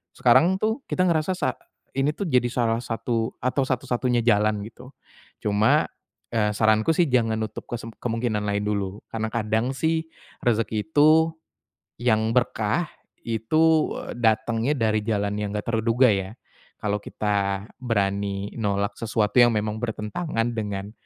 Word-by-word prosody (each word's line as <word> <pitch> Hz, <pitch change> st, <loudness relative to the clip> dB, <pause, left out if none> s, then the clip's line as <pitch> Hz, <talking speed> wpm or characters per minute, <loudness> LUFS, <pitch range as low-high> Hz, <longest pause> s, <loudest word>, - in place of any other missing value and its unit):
sekarang 165 Hz, +10 st, +4 dB
tuh 220 Hz, +5 st, 0 dB
kita 185 Hz, -, +2 dB
ngerasa 165 Hz, +2 st, +1 dB
sa 130 Hz, -, 0 dB, 0.4 s
ini 140 Hz, +3 st, +1 dB
tuh, 200 Hz, -, -3 dB
jadi 125 Hz, -2 st, +3 dB
salah 115 Hz, -2 st, +1 dB
satu 115 Hz, 0 st, -2 dB
atau 130 Hz, +2 st, +1 dB
satu-satunya 125 Hz, -1 st, 0 dB
jalan, 105 Hz, -2 st, +2 dB
gitu. 125 Hz, +4 st, -12 dB, 0.5 s
Cuma, 105 Hz, +1 st, +3 dB, 0.5 s
eee, 105 Hz, -2 st, +2 dB
saranku 110 Hz, +6 st, +3 dB
sih 170 Hz, -3 st, +3 dB
jangan 115 Hz, -3 st, +2 dB
nutup 110 Hz, -1 st, -5 dB
kesemp 115 Hz, -1 st, -6 dB
kemungkinan 115 Hz, -3 st, -1 dB
lain 100 Hz, 0 st, 0 dB
dulu, 100 Hz, -1 st, -2 dB
karena 110 Hz, -1 st, -2 dB
kadang 110 Hz, +3 st, -1 dB
sih 160 Hz, +3 st, 0 dB, 0.4 s
rezeki 110 Hz, -3 st, 0 dB
itu, 160 Hz, +3 st, +5 dB, 0.7 s
yang 110 Hz, -2 st, +2 dB
berkah, 120 Hz, +5 st, +1 dB, 0.4 s
itu 155 Hz, +8 st, +2 dB, 0.3 s
datangnya 115 Hz, +4 st, +1 dB
dari 110 Hz, -1 st, +2 dB
jalan 105 Hz, -2 st, -1 dB
yang 105 Hz, -1 st, -2 dB
nggak 105 Hz, -, -3 dB
terduga 115 Hz, +3 st, +3 dB
ya. 95 Hz, +3 st, -3 dB, 0.4 s
Kalau 105 Hz, 0 st, -1 dB
kita 100 Hz, -1 st, -1 dB, 0.2 s
berani 100 Hz, -3 st, -1 dB
nolak 100 Hz, 0 st, 0 dB
sesuatu 110 Hz, +1 st, +2 dB
yang 120 Hz, -, +6 dB
memang 105 Hz, +1 st, -2 dB
bertentangan 115 Hz, +2 st, -2 dB
dengan 100 Hz, -2 st, -4 dB
115 Hz, 135 wpm, -24 LUFS, 105-125 Hz, 0.7 s, yang